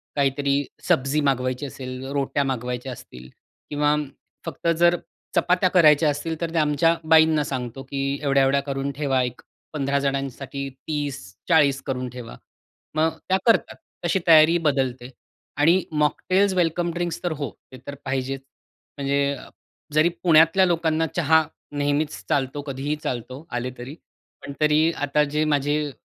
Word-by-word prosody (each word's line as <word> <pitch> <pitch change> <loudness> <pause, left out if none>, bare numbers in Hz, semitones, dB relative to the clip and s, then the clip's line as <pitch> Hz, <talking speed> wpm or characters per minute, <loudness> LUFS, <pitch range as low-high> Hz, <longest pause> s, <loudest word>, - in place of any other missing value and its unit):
काहीतरी 140 0 +1 0.2
सब्जी 135 +3 +1
मागवायची 130 -1 0
असेल, 130 -1 -7
रोट्या 140 0 0
मागवायच्या 125 -1 -3
असतील 65 - -11 0.4
किंवा 150 0 +2 0.5
फक्त 165 0 -5
जर 175 +1 +4 0.4
चपात्या 180 +1 +3
करायच्या 155 -4 +5
असतील 155 +2 -3
तर 170 - -1
ते - - -1
आमच्या 155 +2 +3
बाईंना 160 -1 +5
सांगतो 130 -2 -5
की 135 +1 -6 0.2
एवढ्या-एवढ्या 140 -1 +3
करून 140 0 -3
ठेवा 135 -3 +1
एक 125 -1 -5 0.3
15 140 -1 0
जणांसाठी 140 0 -3
30-40 140 - -1
करून 130 -2 -3
ठेवा 120 -1 -9 0.6
मग 160 +1 +1
त्या 190 - +4
करतात, 230 -2 +3 0.3
तशी 175 +3 +2
तयारी 160 +1 +7
बदलते. 130 -6 -1 0.5
आणि 165 +5 +4
मॉकटेल्स, 185 +6 +1
वेलकम 175 -1 0
ड्रिंक्स 175 -1 -3
तर 175 - -1
हो, 140 -3 -3 0.2
ते 130 - -10
तर 140 - -5
पाहिजेच. 135 0 -2 0.6
म्हणजे, 140 0 0 0.6
जरी 155 +3 +4
पुण्यातल्या 165 +2 +5
लोकांना 165 -2 +1
चहा 160 -1 +4 0.3
नेहमीच 145 +1 -1
चालतो, 135 +1 0
कधीही 140 +1 -3
चालतो, 130 +4 -5
आले 125 +1 -3
तरी; 125 +5 -8 0.5
पण 140 - -7
तरी 155 +2 +4
आता 145 +1 +1
जे 155 - +2
माझे 145 0 0
145 Hz, 135 wpm, -23 LUFS, 135-160 Hz, 0.6 s, तयारी